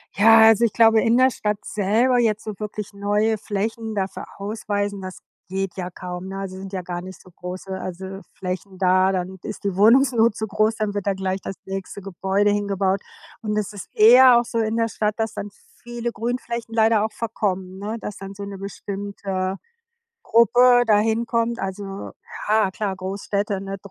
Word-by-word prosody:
Ja, 225 +2 +7
also, 225 +1 +4
ich 225 - +2
glaube, 225 -1 +5
in 235 0 +3
der 260 +1 +5
Stadt 210 -3 -2
selber 225 +5 +2
jetzt 220 -3 +1
so 215 - -5
wirklich 210 -1 -6
neue 205 +2 0
Flächen 220 +2 -3
dafür 195 -1 -3
ausweisen, 205 -1 -3
das 185 -1 -8 0.3
geht 190 -1 -3
ja 180 -1 -4
kaum, 180 +1 -7
ne? 195 0 -6
Also, 195 -1 -5
sind 190 +1 -8
ja 185 -2 -4
gar 175 0 -5
nicht 185 0 -10
so 185 - -18
große, 180 +2 -8
also, 190 +2 -6
Flächen 185 +1 -5
da. 185 0 +3
Dann 185 0 -3
ist 210 - -7
die 200 -2 -1
Wohnungsnot 230 +1 +5
zu 220 - -3
groß, 215 +1 +1
dann 215 -2 -2
wird 205 -1 -4
dann 200 - +2
gleich 190 0 -2
das 195 - -6
nächste 195 +1 -6
Gebäude 195 +2 0
hingebaut. 200 -1 0 0.4
Und 210 -2 -2
es 210 0 -2
ist 200 - -8
eher 245 +3 +8
auch 240 - -2
so 230 0 -2
in 220 0 0
der 230 0 +2
Stadt, 210 -1 -1
dass 225 -1 -2
dann 205 - -5 0.3
viele 240 0 -4
Grünflächen 235 0 -4
leider 220 -1 +4
auch 220 - -2
verkommen, 190 -4 -3
ne, 215 +3 -4
dass 210 - -6
dann 195 0 -8
so 200 - -7
'ne 200 -1 -7
bestimmte 195 -1 -4 0.7
Gruppe 245 +2 +5
da 210 -2 +5
hinkommt. 230 +2 0
Also, 195 +1 -5 0.4
ja 215 -2 +3
klar. 195 0 -3
Großstädte, 200 +1 -2
ne, 195 0 -5
205 Hz, 185 wpm, -22 LUFS, 190-225 Hz, 0.7 s, eher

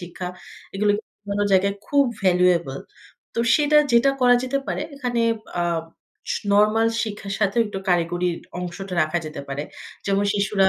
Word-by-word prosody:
শিক্ষা। 180 +1 -7 0.5
এগুলো 205 +1 +2
কিন্তু 215 - -11 0.2
অন্য 205 0 0
জায়গায় 195 +1 +3
খুব 285 -1 +4 0.2
valuable 175 -6 +2 0.5
তো 230 - 0
সেটা 300 0 +4
যেটা 235 +4 +5
করা 245 -1 +6
যেতে 265 +2 -1
পারে - - -2
এখানে 245 -4 -2 0.4
আ - - +2 0.7
স - - 0 0.2
নরমাল 215 +2 +4
শিক্ষার 205 -3 -5
সাথেও 205 +2 +2
একটু 200 -2 -5
কারিগরির 175 0 +1 0.2
অংশটা 180 +1 -5
রাখা 155 +3 0
যেতে 155 +1 -6
পারে। 140 +1 -3 0.4
যেমন 200 0 +2
শিশুরা 200 -1 +2
200 Hz, 150 wpm, -23 LUFS, 180-225 Hz, 0.7 s, করা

